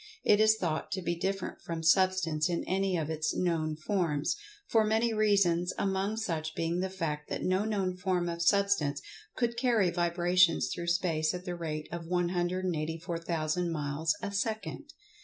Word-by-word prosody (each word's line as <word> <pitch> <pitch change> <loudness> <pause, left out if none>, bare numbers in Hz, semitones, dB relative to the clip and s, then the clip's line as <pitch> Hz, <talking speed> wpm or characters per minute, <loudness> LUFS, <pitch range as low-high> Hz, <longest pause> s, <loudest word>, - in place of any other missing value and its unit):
It 205 - +5
is 215 0 +6
thought 165 -6 -2
to 190 - -2
be 170 - 0
different 190 +2 -3
from 165 -1 -5
Substance 180 -2 +3
in 170 - -1
any 190 0 0
of 160 -1 -2
its 155 -1 -1
known 160 -3 0
forms, 160 -3 0 0.3
for 225 -1 +4
many 220 +2 +2
reasons, 195 -5 +2
among 195 +2 0
such 160 -7 -3
being 165 +1 -1
the 190 +1 -1
fact 155 -5 -4
that - - -3
no 185 +3 +1
known 195 -4 -1
form 180 -1 0
of 170 0 -3
Substance 185 -6 +2 0.4
could 235 -1 -1
carry 235 -7 +2
vibrations 175 0 +2
through 170 - -5
space 170 -2 +1
at 180 +1 -7
the 180 - -3
rate 155 -3 -4
of 170 -1 -6
184,000 175 -1 -1
miles 150 +1 -1
a 200 - -2
second. 220 +8 -3
175 Hz, 160 wpm, -30 LUFS, 165-195 Hz, 0.4 s, is